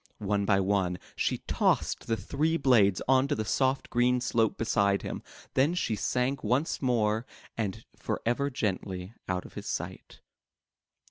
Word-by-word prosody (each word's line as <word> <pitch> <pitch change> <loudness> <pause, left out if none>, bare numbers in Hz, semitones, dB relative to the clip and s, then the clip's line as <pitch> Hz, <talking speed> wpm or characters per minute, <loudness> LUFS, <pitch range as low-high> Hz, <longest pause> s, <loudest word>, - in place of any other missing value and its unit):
One 100 0 0
by 100 -1 +3
one, 95 -2 +1 0.2
she - - 0
tossed - - +1
the 115 - +1
three 155 +7 0
blades 110 - +4
onto 135 +2 +3
the 110 - -2
soft 130 +4 0
green 125 +1 +3
slope 115 -3 +1
beside 100 -3 +2
him, - - -4 0.3
then 145 +7 +3
she 115 -11 0
sank 125 +5 -1
once 125 +9 0
more 115 -4 +1 0.3
and 105 -5 -3
forever 120 +5 -1
gently 95 -5 -3 0.2
out 90 0 -1
of - - -12
his - - -7
sight. - - -5
115 Hz, 145 wpm, -29 LUFS, 100-130 Hz, 0.3 s, blades